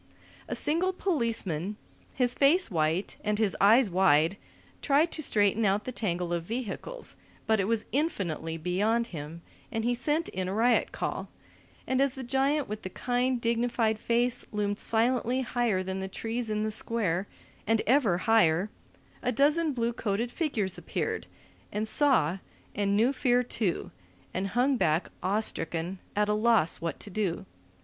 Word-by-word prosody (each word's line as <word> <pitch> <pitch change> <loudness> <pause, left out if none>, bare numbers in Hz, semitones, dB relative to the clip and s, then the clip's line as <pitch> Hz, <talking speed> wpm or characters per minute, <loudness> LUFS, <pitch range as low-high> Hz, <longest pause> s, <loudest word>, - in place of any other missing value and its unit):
A - - -3
single 345 +5 +1
policeman, 225 - -1 0.4
his 250 -2 +1
face 300 - +3
white 160 +3 0
and 210 0 0
his 215 -3 +1
eyes 225 +5 +6
wide, 180 -1 +3 0.4
tried 300 +3 +3
to 315 - -4
straighten 210 -4 +2
out 200 +1 +2
the 255 - -5
tangle 180 -7 -2
of 170 - 0
vehicles, 245 - -5 0.3
but 220 -1 +2
it 195 - +1
was 225 +1 0
infinitely 185 - -2
beyond 205 +8 +1
him 160 +2 -7 0.3
and 225 -1 -2
he 245 - +2
sent 295 +7 0
in 185 0 -3
a 190 - -3
riot 235 +2 +3
call; - - -4 0.6
and 260 +1 +1
as 275 -2 +1
the 265 - -6
giant 270 +3 +1
with 210 +1 -5
the 185 - -6
kind, 245 +4 0
dignified 230 -1 0
face 240 +2 +1
loomed 205 -1 -1
silently 245 +2 +1
higher 235 -6 0
than 190 0 -4
the 190 - -3
trees 225 +4 -4
in 215 0 -1
the 215 - -1
Square, 205 -4 0 0.4
and 225 0 +2
ever 235 -8 +3
higher, 195 -2 +3 0.5
a 250 - 0
dozen 300 +6 +3
blue 235 -2 -1
coated 230 +1 -2
figures 225 - -1
appeared, - - -3 0.4
and 215 +1 -2
saw, 215 - +3 0.3
and 200 0 +1
knew 240 +6 +3
fear 250 -2 +2
too, 215 -6 -2 0.4
and 190 +2 -1
hung 260 +2 +3
back 160 -4 +1
awe 205 +3 +1
stricken, 170 -2 -2 0.2
at 210 0 +2
a 210 - +2
loss 215 -6 +3
what 165 -1 -3
to 205 - -7
do. 180 - -2
220 Hz, 160 wpm, -28 LUFS, 190-250 Hz, 0.6 s, eyes